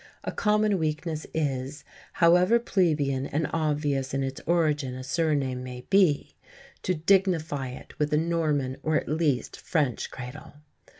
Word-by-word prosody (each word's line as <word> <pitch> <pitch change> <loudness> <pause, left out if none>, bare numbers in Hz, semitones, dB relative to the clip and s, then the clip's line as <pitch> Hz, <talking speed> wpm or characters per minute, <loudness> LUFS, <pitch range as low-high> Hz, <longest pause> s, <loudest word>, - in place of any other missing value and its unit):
A - - -3
common 210 -2 +2
weakness 155 0 -2
is, 140 -2 -2 0.3
however 180 +6 +5
plebeian 150 - +1
and 150 +2 -1
obvious 145 -4 0
in 135 - 0
its 135 0 -4
origin 150 -6 +1
a 130 - -7
surname 140 -3 0
may 125 -1 -7
be, 185 -7 +3 0.5
to 185 - 0
dignify 165 -5 +1
it 125 - -10
with 150 0 0
a 150 - +3
Norman 150 -5 0
or 155 0 0
at - - 0
least 150 -5 0
French 145 -8 -1
cradle. 130 +5 -9
150 Hz, 140 wpm, -27 LUFS, 135-170 Hz, 0.5 s, however